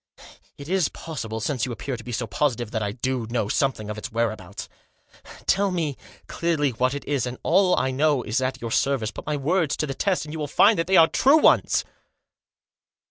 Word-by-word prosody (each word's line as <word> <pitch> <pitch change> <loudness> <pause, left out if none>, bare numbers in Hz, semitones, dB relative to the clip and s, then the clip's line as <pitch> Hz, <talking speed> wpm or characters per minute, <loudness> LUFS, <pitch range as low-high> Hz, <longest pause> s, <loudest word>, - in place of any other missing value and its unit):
It 140 - -9
is 185 -3 +1
possible, 115 -9 -6
since 115 +2 -2
you - - -5
appear 125 +3 -4
to 115 - -10
be 125 - -7
so 120 0 -2
positive, 120 -1 -1
that 110 - -2
I 105 -1 -1
do 125 +1 -3
know 115 -3 -1
something 120 -2 0
of 105 0 -5
its - - -7
whereabouts. 110 -4 -3 0.8
Tell 200 +1 +2
me, 165 -6 -2 0.3
clearly, 160 -5 0
what 130 +3 0
it 145 - -6
is, 140 -4 -1
and 125 +1 -6
all 185 +2 +4
I 130 - +1
know 145 -1 +1
is 115 +5 -1
at 130 0 -2
your 115 -1 -4
service. 130 -5 +1
Put - - -10
my 150 -1 0
words 160 +2 0
to - - -1
the 135 - -4
test, 185 -1 0
and 150 - -8
you 160 - -5
will 150 - -2
find 205 +7 +4
that 165 - 0
they 190 0 +4
are 165 -1 +8
true 275 - +4
ones." - - +3
135 Hz, 215 wpm, -24 LUFS, 115-160 Hz, 0.8 s, are